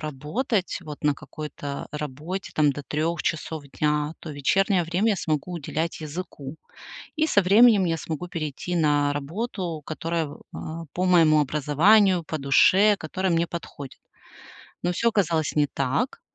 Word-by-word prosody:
работать 160 - -2
вот 150 -3 -9
на 145 -1 +3
какой-то 145 -1 -7
работе 150 +6 -5
там 150 -2 +3
до 145 - -7
3 155 +4 -2
часов 160 -1 -3 0.2
дня, 150 0 +1
то 160 - -7
вечернее 185 +7 +2
время 185 +7 +1
я 205 - +1
смогу 155 +1 -2
уделять 165 0 -3
языку, 155 -2 -7 0.6
и 315 +1 +1
со 200 - +4
временем 210 +1 +6
я 165 -1 0
смогу 160 +2 -5
перейти 165 +1 -4
на 145 -3 +2
работу, 170 +2 -4
которая, 165 0 -2 0.2
а, 165 +1 -6
по 185 +1 -1
моему 160 -4 +5
образованию, 170 +7 +3
по 155 0 -4
душе, 190 +9 +5
которая 185 +3 -2
мне 170 0 +2
подходит. 145 -6 -8 0.8
Но 175 +1 0
всё 235 +6 +1
оказалось 170 -8 0
не 150 - +4
так. 140 - -1
160 Hz, 145 wpm, -25 LUFS, 150-185 Hz, 0.8 s, временем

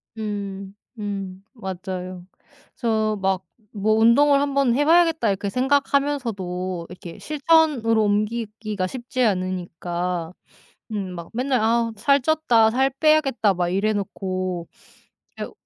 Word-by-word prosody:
음 200 -3 -5 0.3
음 195 -2 -5
맞아요. 185 -4 -6 0.5
그래서 220 -3 0
막 190 -1 0 0.3
뭐 215 +1 +1
'운동을 275 +6 +5
한 280 -1 -1
번 270 -4 +3
해 290 +3 +2
봐야겠다.' 325 -6 +4
이렇게 200 0 -1
생각하면서도 240 -10 0
이렇게 175 -1 -10
실천으로 295 -7 +2
옮기기가 215 -1 -1
쉽지 255 +3 -4
않으니까. 180 -3 -2 0.6
음 195 -4 -4
막 170 -1 -8
맨날 255 +2 0
'아 230 +1 +2
살 275 +7 +3
쪘다, 250 -7 +3
살 265 +4 +1
빼야겠다' 295 -9 +3
막 175 -1 0
이래 200 +4 +1
놓고 185 -3 -3 0.7
그게 - - -5
215 Hz, 255 characters per minute, -23 LUFS, 185-255 Hz, 0.7 s, 운동을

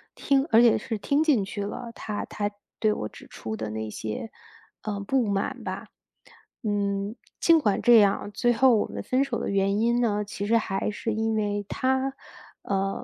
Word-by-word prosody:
听， 275 -1 +2
而 225 - +7
且 235 -2 +6
是 225 -4 -4
听 280 +9 +1
进 270 -11 +3
去 205 0 -4
了， 230 +3 -5
他 210 -1 -4
他 205 -1 -2 0.3
对 215 -1 +3
我 105 - -4
指 - - -14
出 110 0 -6
的 110 -1 -4
那 110 0 -4
些， 110 - -5 0.5
呃， 205 -2 -3
不 240 +3 +1
满 200 -1 -2
吧。 - - -5 0.8
嗯， 200 0 -1 0.2
尽 330 -1 +5
管 205 -8 +1
这 240 -1 +7
样， 205 0 +2
最 240 +4 +2
后 245 0 +5
我 - - 0
们 - - -6
分 260 +2 +2
手 250 -5 -2
的 - - -3
原 200 +1 +1
因 235 +2 +2
呢， 210 -3 +1
其 200 0 -5
实 230 +1 +4
还 195 -2 -1
是 220 +1 -3
因 220 0 0
为 205 -1 -1
他， 265 +1 0 0.5
呃， 195 0 -1
210 Hz, 205 characters per minute, -26 LUFS, 200-240 Hz, 0.8 s, 而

